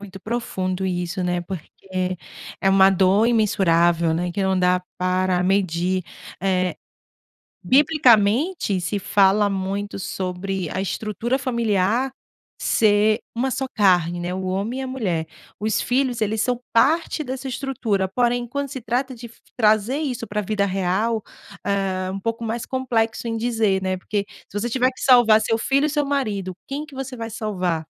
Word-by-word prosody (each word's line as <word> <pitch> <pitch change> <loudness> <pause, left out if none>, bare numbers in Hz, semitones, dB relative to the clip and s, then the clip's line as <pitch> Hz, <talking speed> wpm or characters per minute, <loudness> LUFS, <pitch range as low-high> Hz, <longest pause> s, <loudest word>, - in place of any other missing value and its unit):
Muito 195 -2 -10
profundo 190 -5 -3
isso, 180 0 -2
né, 180 0 0
porque 185 +1 -5 0.4
é 195 - +2
uma 195 0 +6
dor 195 +3 +3
imensurável, 175 -7 +3
né, 175 +2 -1
que 195 - -1
não 190 -1 +1
dá 180 0 +2 0.2
para 185 0 +1
medir. 185 -1 +1 0.4
Eh, 185 -2 +1 0.9
biblicamente, 255 - +3
se 205 +3 -2
fala 200 +1 +3
muito 195 +1 -3
sobre 185 -1 -3
a 185 - -2
estrutura 220 +5 -2
familiar 235 0 +1 0.5
ser 215 +1 +3 0.2
uma 260 +3 0
só 265 +1 -2
carne, 175 -4 +3
né, 175 +1 -3
o 190 0 -4
homem 200 +8 -2
e - - -3
a - - -4
mulher. 185 -11 -2 0.3
Os 215 0 0
filhos 250 -2 0
eles 215 +1 0
são 250 0 0
parte 305 +6 +2
dessa 265 +1 -5
estrutura, 240 -7 -1
porém, 240 +3 0
quando 280 +2 -3
se 260 - -5
trata 250 +4 -1
f 235 -1 -10 0.3
trazer 215 +4 +3
isso 255 -7 -3
pra 210 - -2
vida 200 0 0
real, 195 +4 0 0.4
eh, 190 -2 -1
um 195 - -4
pouco 230 +2 -3
mais 230 +2 -3
complexo 235 -3 -1
em 225 - -2
dizer, 220 -5 +1
né. 185 0 -1
Por - - -19
que 205 -1 -1 0.2
se 205 - -5
você 240 +3 -2
tiver 255 +2 +2
que 255 - -14
salvar 235 -4 +6
seu 225 +1 +1
filho 275 +5 +2
e - - -2
seu 295 -1 0
marido, 210 -10 -2
quem 290 +3 -4
que 290 -3 -14
você 265 -1 -5
vai 230 0 -5
salvar? 185 -7 -2
210 Hz, 165 wpm, -22 LUFS, 185-245 Hz, 0.9 s, uma